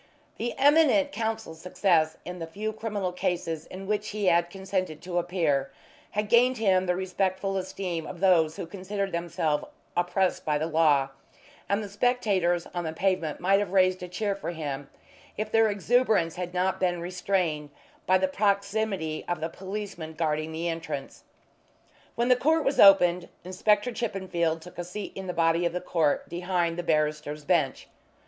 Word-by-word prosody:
The 235 Hz, +1 st, -2 dB
eminent 290 Hz, 0 st, +4 dB
counsel's 220 Hz, -, -4 dB
success 170 Hz, -3 st, +2 dB
in 180 Hz, 0 st, -6 dB
the 165 Hz, -, -5 dB
few 215 Hz, +6 st, -4 dB
criminal 210 Hz, -4 st, -3 dB
cases 175 Hz, -4 st, -2 dB
in 190 Hz, +1 st, -8 dB
which 210 Hz, +1 st, -1 dB
he 210 Hz, -1 st, -3 dB
had 170 Hz, -1 st, +3 dB
consented 190 Hz, -4 st, -3 dB
to 175 Hz, -1 st, -1 dB
appear 160 Hz, -6 st, 0 dB, 0.5 s
had 210 Hz, 0 st, +1 dB
gained 245 Hz, +3 st, +4 dB
him 190 Hz, -4 st, +2 dB
the 180 Hz, -, +2 dB
respectful 190 Hz, +1 st, -1 dB
esteem 185 Hz, -3 st, -3 dB
of 175 Hz, -, -8 dB
those 165 Hz, -4 st, +4 dB
who 190 Hz, -, -5 dB
considered 195 Hz, +2 st, -4 dB
themselves 165 Hz, -3 st, -1 dB, 0.3 s
oppressed 180 Hz, +1 st, +1 dB
by 150 Hz, -1 st, +1 dB
the 155 Hz, -, -1 dB
law, 150 Hz, -4 st, +3 dB, 0.6 s
and 200 Hz, +2 st, +1 dB
the -, -, -5 dB
spectators 200 Hz, -6 st, +1 dB
on 175 Hz, -1 st, -2 dB
the 160 Hz, -1 st, -3 dB
pavement 170 Hz, -4 st, 0 dB
might 195 Hz, +2 st, +3 dB
have 200 Hz, -2 st, -3 dB
raised 185 Hz, -1 st, +3 dB
a 180 Hz, -, -5 dB
cheer 200 Hz, +3 st, -1 dB
for 195 Hz, -, -5 dB
him 145 Hz, -4 st, -5 dB, 0.5 s
if 215 Hz, 0 st, -3 dB
their 225 Hz, -1 st, +4 dB
exuberance 205 Hz, -4 st, +2 dB
had 180 Hz, -1 st, -4 dB
not 185 Hz, +1 st, 0 dB
been 180 Hz, -2 st, +1 dB
restrained 175 Hz, -4 st, -1 dB, 0.4 s
by 185 Hz, -, +5 dB
the 190 Hz, 0 st, +1 dB
proximity 200 Hz, -4 st, 0 dB
of 175 Hz, -2 st, -1 dB
the 160 Hz, +1 st, -3 dB
policeman 190 Hz, -4 st, -6 dB
guarding 155 Hz, -1 st, -1 dB
the 165 Hz, +2 st, -3 dB
entrance. 165 Hz, -4 st, -5 dB, 0.9 s
When 235 Hz, +1 st, +1 dB
the 250 Hz, -, +7 dB
court 315 Hz, +5 st, +2 dB
was 275 Hz, -, 0 dB
opened 180 Hz, -3 st, +6 dB
Inspector 205 Hz, +5 st, +1 dB
Chippenfield 185 Hz, -8 st, -2 dB
took 180 Hz, 0 st, -12 dB
a -, -, -2 dB
seat 190 Hz, +4 st, -6 dB
in 190 Hz, -1 st, -7 dB
the -, -, -1 dB
body 165 Hz, 0 st, +2 dB
of 170 Hz, -1 st, 0 dB
the 180 Hz, -, -1 dB
court 165 Hz, -5 st, 0 dB
behind 175 Hz, -1 st, -1 dB
the -, -, +1 dB
barrister's 150 Hz, -2 st, -1 dB
bench. 155 Hz, -7 st, +1 dB
180 Hz, 170 wpm, -27 LUFS, 165-200 Hz, 0.9 s, the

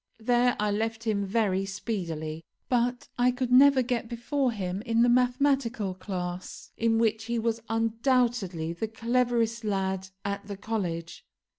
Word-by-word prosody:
There 245 Hz, +2 st, +3 dB
I 210 Hz, 0 st, +1 dB
left 225 Hz, +2 st, -2 dB
him 205 Hz, -3 st, 0 dB
very 195 Hz, -2 st, +1 dB
speedily; 165 Hz, -6 st, -4 dB, 0.3 s
but 245 Hz, 0 st, 0 dB
I 245 Hz, +1 st, +5 dB
could 250 Hz, 0 st, -2 dB
never 265 Hz, +1 st, +7 dB
get 235 Hz, -2 st, -2 dB
before 250 Hz, +2 st, 0 dB
him 190 Hz, -3 st, -3 dB
in 230 Hz, 0 st, +2 dB
the 240 Hz, -, +4 dB
mathematical 245 Hz, -4 st, +2 dB
class, 180 Hz, -1 st, -6 dB
in 225 Hz, 0 st, +2 dB
which 225 Hz, -1 st, +1 dB
he 235 Hz, +1 st, -1 dB
was 230 Hz, 0 st, -1 dB
undoubtedly 225 Hz, -7 st, +1 dB
the 195 Hz, +6 st, -3 dB
cleverest 235 Hz, 0 st, 0 dB
lad 190 Hz, -2 st, -1 dB, 0.2 s
at 200 Hz, 0 st, -3 dB
the 200 Hz, -1 st, -6 dB
college. 180 Hz, -6 st, -4 dB
225 Hz, 145 wpm, -28 LUFS, 195-245 Hz, 0.3 s, never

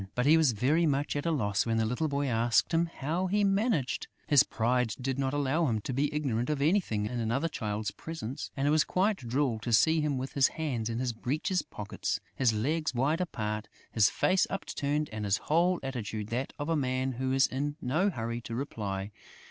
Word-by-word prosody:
But 125 Hz, -, +1 dB
he 155 Hz, +3 st, +7 dB
was 155 Hz, -6 st, +4 dB
very 150 Hz, +10 st, +2 dB
much 145 Hz, 0 st, 0 dB
at 145 Hz, +3 st, -2 dB
a -, -, +2 dB
loss 105 Hz, -10 st, +1 dB
when 115 Hz, 0 st, +1 dB
the 110 Hz, -, +2 dB
little 125 Hz, +8 st, 0 dB
boy 140 Hz, -1 st, -1 dB
asked 115 Hz, -2 st, +2 dB
him 165 Hz, +1 st, +3 dB
"how 165 Hz, +4 st, -2 dB
he 205 Hz, +2 st, +2 dB
managed." 195 Hz, -, +1 dB, 0.2 s
His 145 Hz, -3 st, +6 dB
pride 120 Hz, -3 st, 0 dB
did 135 Hz, +1 st, -2 dB
not 135 Hz, -1 st, 0 dB
allow 145 Hz, +3 st, +1 dB
him 110 Hz, -4 st, 0 dB
to 130 Hz, -, -4 dB
be 140 Hz, +3 st, +1 dB
ignorant 130 Hz, -5 st, -1 dB
of 150 Hz, -2 st, 0 dB
anything 145 Hz, -, +1 dB
in 120 Hz, +3 st, -3 dB
another 120 Hz, +8 st, 0 dB
child's 105 Hz, -8 st, -3 dB
presence; 140 Hz, -6 st, -6 dB
and 135 Hz, +1 st, +1 dB
it -, -, +4 dB
was 155 Hz, 0 st, +4 dB
quite 195 Hz, +3 st, +1 dB
droll 125 Hz, -1 st, -1 dB
to 120 Hz, +2 st, -4 dB
see 160 Hz, +8 st, +4 dB
him 150 Hz, -3 st, 0 dB
with 130 Hz, +1 st, -4 dB
his 135 Hz, -1 st, +5 dB
hands 130 Hz, -9 st, -3 dB
in 115 Hz, -, -2 dB
his 125 Hz, -1 st, -1 dB
breeches 150 Hz, +10 st, -1 dB
pockets, 100 Hz, -1 st, -4 dB
his 125 Hz, -4 st, +2 dB
legs 150 Hz, +7 st, -1 dB
wide 145 Hz, +8 st, +1 dB
apart, 105 Hz, -10 st, -3 dB, 0.2 s
his 105 Hz, -3 st, +4 dB
face 185 Hz, 0 st, +2 dB
upturned 150 Hz, -5 st, -2 dB
and 110 Hz, -1 st, -4 dB
his 100 Hz, -1 st, +2 dB
whole 175 Hz, +3 st, +2 dB
attitude 110 Hz, -5 st, -4 dB
that 125 Hz, +4 st, -2 dB
of 145 Hz, -, -4 dB
a 165 Hz, -, +1 dB
man 130 Hz, -2 st, 0 dB
who 130 Hz, +1 st, -2 dB
is 135 Hz, +1 st, +4 dB
in 145 Hz, +3 st, -2 dB
no 160 Hz, +11 st, +1 dB
hurry 115 Hz, -, -4 dB
to 115 Hz, 0 st, -6 dB
reply. 100 Hz, -6 st, -4 dB
135 Hz, 210 wpm, -30 LUFS, 115-155 Hz, 0.2 s, he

